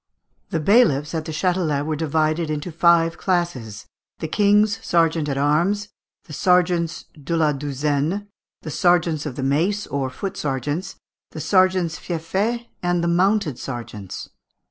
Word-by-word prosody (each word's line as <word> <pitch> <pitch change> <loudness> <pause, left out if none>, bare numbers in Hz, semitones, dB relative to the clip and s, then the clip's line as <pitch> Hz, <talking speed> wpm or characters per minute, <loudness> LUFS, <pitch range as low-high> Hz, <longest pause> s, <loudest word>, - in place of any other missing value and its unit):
] - - -46
The 165 - -1
bailiffs 150 - +3
at 160 -1 -2
the 160 - -5
Châtelet 160 -3 0
were 155 0 -1
divided 155 +1 0
into 155 +3 -3
five 165 0 +3
classes: 135 - -2 0.3
the 160 - -4
king's 205 +4 +3
sergeant 165 -3 +1
at 135 - -2
arms, 175 +9 +1 0.3
the 155 - -12
sergeants 175 -1 +1 0.2
de 165 +4 -1
la 155 -2 +3
douzaine, 145 +6 -1 0.4
the 155 - -5
sergeants 170 -3 +2
of 130 - -6
the 135 - -4
mace, 170 +10 +1
or 135 -2 -2
foot 195 +9 -5
sergeants, 145 +2 -3 0.4
the - - -6
sergeants 185 -3 +2
fieffés, 195 +8 -2 0.2
and 175 -1 0
the - - +1
mounted 180 - +1
sergeants. 115 -7 -7
165 Hz, 145 wpm, -22 LUFS, 145-180 Hz, 0.4 s, bailiffs